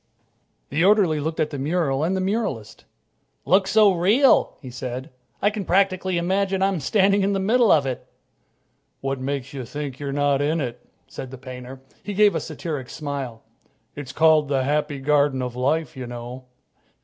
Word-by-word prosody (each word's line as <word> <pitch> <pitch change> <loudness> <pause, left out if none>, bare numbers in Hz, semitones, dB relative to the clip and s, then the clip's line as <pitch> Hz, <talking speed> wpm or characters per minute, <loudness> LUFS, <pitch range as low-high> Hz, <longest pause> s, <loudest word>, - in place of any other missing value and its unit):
The 155 +5 +1
orderly 190 -6 +4
looked 160 +2 -3
in - - +4
at 155 - -4
the 145 - -5
mural 145 -1 0
and 185 +4 0
the - - -1
muralist. 190 - -3 0.6
"Looks 190 +1 +3
so 215 -2 +6
real," 210 +11 +3
he 130 -4 -9
said, 125 +1 -6 0.3
"I 205 - +4
can 210 -1 -4
practically 185 0 +1
imagine 190 +2 0
I'm 195 -3 +1
standing 200 +6 +3
in 200 +1 +1
the 195 - 0
middle 225 +4 +3
of 145 -3 +4
it." 130 -2 -4 0.9
"What 135 0 -2
makes 135 0 -4
you 135 -2 -5
think 140 +1 -6
you're 140 -1 -4
not 145 0 +1
in 155 +3 +1
it?" 125 -4 -5 0.2
said 130 - -8
the 130 - -9
painter. 130 0 -9 0.2
He 205 - -6
gave 210 0 +5
a - - 0
satiric 145 -7 -5
smile. 140 -6 -5 0.5
"It's 145 -3 -7
called 155 0 +4
'The 135 -2 +1
Happy 150 +1 0
Garden 140 -1 +2
of 125 -1 -5
Life,' 150 +6 0
you 130 -2 -6
know." 120 +2 -8
150 Hz, 180 wpm, -23 LUFS, 130-190 Hz, 0.9 s, so